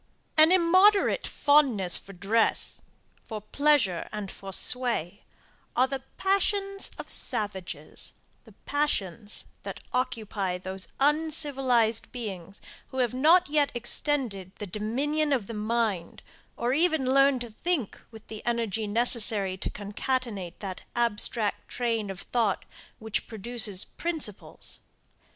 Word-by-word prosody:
An 315 +2 +6
immoderate 370 +3 +4
fondness 265 -11 +2
for 195 - -13
dress, 205 +5 +2 0.4
for 220 -2 -7
pleasure 225 - +1
and 205 -2 -6
for 195 0 -9
sway, 210 -4 +3 0.5
are 255 - +4
the 265 0 -5 0.2
passions 395 0 +1
of - - -8
savages; 200 -4 0 0.3
the - - -18
passions 215 - -1 0.2
that - - -7
occupy 220 -7 -2
those 190 +1 -3
uncivilized 270 -6 +1
beings 200 -6 -7 0.3
who 260 - -10
have 250 -2 0
not 325 +8 +4
yet 290 -1 +1
extended 240 -6 -2
the 210 - -7
dominion 270 - -2
of 250 -7 0
the 230 - -8
mind, 215 -5 -2 0.3
or 240 +2 -1
even 315 -2 +2
learned 275 0 +3
to 240 -2 -6
think 285 - -3
with 220 -1 -14
the 215 -1 -9
energy 225 -3 -1
necessary 215 -3 +5
to 190 - -5
concatenate 205 -2 -4
that 190 -3 -6
abstract 230 -2 -1
train 230 -4 -2
of 195 -1 -6
thought 225 -5 -1 0.3
which 220 -1 -3
produces 220 -3 0
principles. 320 - -3
235 Hz, 120 wpm, -27 LUFS, 205-280 Hz, 0.5 s, An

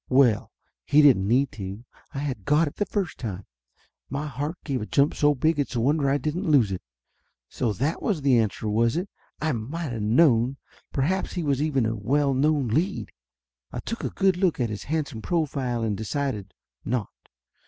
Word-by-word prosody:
Well, 125 -5 +3 0.3
he 150 +2 +5
didn't 115 -10 +5
need 130 +5 +2
to. 100 +2 -7 0.3
I - - -8
had 135 -7 -3
got 150 - +3
it 145 - -7
the 205 - 0
first 190 -6 -2
time. 100 -5 -5 0.6
My 140 +3 -3
heart 145 +3 -3
give 135 -5 -2
a 105 - -5
jump 140 +1 +3
so 145 0 +3
big 155 +3 +1
it's 140 -2 -1
a - - +1
wonder 140 +3 +2
I 140 - +3
didn't 155 +4 -2
lose 130 -10 +4
it. 95 - -3 0.7
So 120 -4 -1
that 140 - -1
was 175 -9 -1
the 130 -4 +5
answer, 110 0 -1
was 115 +5 +2
it? 185 +3 -3 0.3
I 155 +1 0
might 135 +5 -4
of 115 - -4
known! 120 +2 +3 0.3
Perhaps 175 +8 0
he 175 - -2
was 140 -2 +1
even 140 -6 +1
a 115 +1 -1
well 140 +7 +1
known 140 -1 +2
lead? 170 - -1 0.6
I - - -4
took 230 - -5
a - - -1
good 190 -2 +2
look 180 -5 +1
at 120 -3 0
his 105 - -6
handsome 150 -6 -2
profile, 135 -8 -1
and 110 -2 0
decided! 110 -2 -3 0.3
not. 115 -1 -2
135 Hz, 195 wpm, -25 LUFS, 115-155 Hz, 0.7 s, he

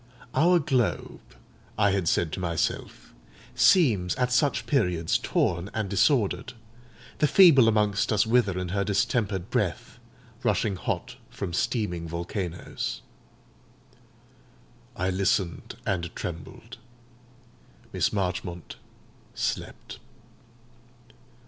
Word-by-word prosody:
"Our 175 +3 +4
globe," 135 -7 -1 0.6
I 100 -2 +3
had 95 -3 -1
said 85 -1 +1
to - - -4
myself, 85 -3 -3 0.4
"seems 120 - +3
at 125 -1 0
such 135 +3 +1
periods 90 - +1
torn 85 +2 0
and 105 -3 -2
disordered; 110 +2 +1 0.7
the 150 - +4
feeble 150 -9 +7
amongst 105 -2 +1
us 105 -1 +3
wither 110 -5 +2
in 90 -1 -3
her 100 +2 0
distempered 100 -2 -1
breath, - - -2 0.4
rushing 100 - +1
hot 90 - -4
from 90 -4 -6
steaming 90 -5 -1
volcanoes." 85 +1 -5 1.9
I 95 +1 -1
listened 95 -2 -1
and 85 -3 -1
trembled; 85 -4 -7 1.2
Miss - - +1
Marchmont 90 -3 -4 0.6
slept. - - -4
100 Hz, 100 wpm, -26 LUFS, 90-120 Hz, 1.9 s, feeble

